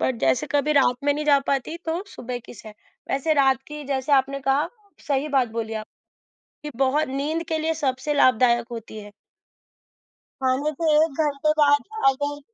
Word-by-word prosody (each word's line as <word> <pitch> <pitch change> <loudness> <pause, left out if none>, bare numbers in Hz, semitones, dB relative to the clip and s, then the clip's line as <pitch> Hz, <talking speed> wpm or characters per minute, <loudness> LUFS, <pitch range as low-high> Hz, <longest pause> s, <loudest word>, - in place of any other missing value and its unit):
But 260 - 0
जैसे 130 -1 +2
कभी 290 +1 +1
रात 265 -4 +3
में 285 - +3
नहीं 300 +1 -3
जा 285 -2 +5
पाती 275 +4 -1
तो 330 +3 -2
सुबह 245 -7 -6
की - - -11
सैर। 215 -2 -12 0.4
वैसे 275 +4 +1
रात 270 -2 +3
की 300 0 -7
जैसे 270 +1 -2
आपने 275 0 +2
कहा, 270 +2 +1 0.4
सही 280 +1 0
बात 265 -4 +2
बोली 225 -1 -4
आपने 215 0 -9 0.7
कि 250 - -17
बहुत 275 +3 +2
नींद 290 +5 -2
के 320 - 0
लिए 320 +1 -1
सबसे 275 -1 -1
लाभदायक 240 -3 +3
होती 225 -2 -8
है। 205 0 -12 1.3
खाने 260 +4 +1
के 335 - -3 0.2
1 320 - -4
घंटे 295 0 0
बाद 290 -1 +4 0.2
अगर 285 +2 -1
275 Hz, 175 wpm, -23 LUFS, 255-295 Hz, 1.3 s, जा